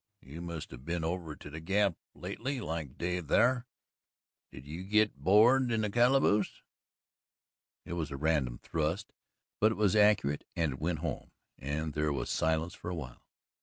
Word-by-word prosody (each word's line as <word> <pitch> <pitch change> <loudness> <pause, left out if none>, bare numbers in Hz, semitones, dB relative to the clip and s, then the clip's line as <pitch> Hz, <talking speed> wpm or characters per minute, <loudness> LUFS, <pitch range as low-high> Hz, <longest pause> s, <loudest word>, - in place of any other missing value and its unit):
You 75 +5 -9
must 85 -3 -6
have 65 -1 -10
been 85 +2 -2
over 80 -2 -3
to 75 - -11
the 80 - -6
Gap 100 +3 +2 0.2
lately 135 +2 -4
like 80 - -5
Dave 90 -2 -2
thar 125 - +3 0.8
did 65 - -11
you 80 +5 -6
git 105 +2 +2
board 120 +6 +5
in 110 -1 +1
the 105 -1 -1
calaboose?" 120 -3 +3 1.2
It - - -5
was 80 -3 -2
a 70 - -5
random 70 -5 +1
thrust, 80 +4 -2 0.5
but 110 +1 +5
it - - -2
was 105 -1 +2
accurate 105 -9 +4
and 80 -5 0
it 65 - -9
went 80 +1 -1
home, - - -4 0.3
and 75 +3 -3
there 75 0 0
was 70 - -2
silence 80 +2 0
for - - -7
a 90 - -3
while. 65 -7 -8
85 Hz, 170 wpm, -31 LUFS, 75-105 Hz, 1.2 s, board